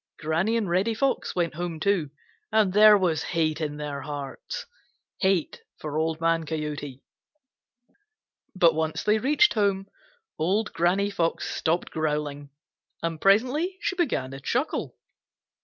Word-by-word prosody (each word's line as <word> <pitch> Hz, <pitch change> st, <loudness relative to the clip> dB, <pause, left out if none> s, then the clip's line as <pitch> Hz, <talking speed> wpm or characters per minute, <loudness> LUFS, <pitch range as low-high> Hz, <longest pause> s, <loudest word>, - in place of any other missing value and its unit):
Granny 170 Hz, +9 st, 0 dB
and 220 Hz, -4 st, -1 dB
Reddy 190 Hz, +6 st, +1 dB
Fox 270 Hz, +4 st, 0 dB
went 175 Hz, -2 st, 0 dB
home 170 Hz, 0 st, -4 dB
too, 180 Hz, -5 st, +1 dB, 0.4 s
and 215 Hz, -4 st, +3 dB
there 210 Hz, 0 st, +8 dB
was 170 Hz, -5 st, +1 dB
hate 160 Hz, -2 st, -1 dB
in 150 Hz, -1 st, -3 dB
their 145 Hz, -2 st, -5 dB
hearts,—hate 155 Hz, -, -4 dB, 0.2 s
for 150 Hz, -1 st, -6 dB
Old 160 Hz, 0 st, -1 dB
Man 165 Hz, 0 st, +1 dB
Coyote. 150 Hz, -4 st, -5 dB, 1.5 s
But 170 Hz, -3 st, +5 dB
once 160 Hz, 0 st, -2 dB
they 210 Hz, +1 st, +3 dB
reached 300 Hz, -, +4 dB
home, 200 Hz, -3 st, +1 dB, 0.5 s
Old 200 Hz, +7 st, 0 dB
Granny 190 Hz, +4 st, +1 dB
Fox 165 Hz, -4 st, -1 dB
stopped 165 Hz, +2 st, 0 dB
growling, 150 Hz, -2 st, -2 dB, 0.5 s
and 165 Hz, -2 st, -3 dB
presently 260 Hz, -, +2 dB
she 375 Hz, -, -2 dB
began 245 Hz, -, -1 dB
to 135 Hz, -, -7 dB
chuckle. 255 Hz, -, -2 dB
170 Hz, 130 wpm, -26 LUFS, 155-210 Hz, 1.5 s, there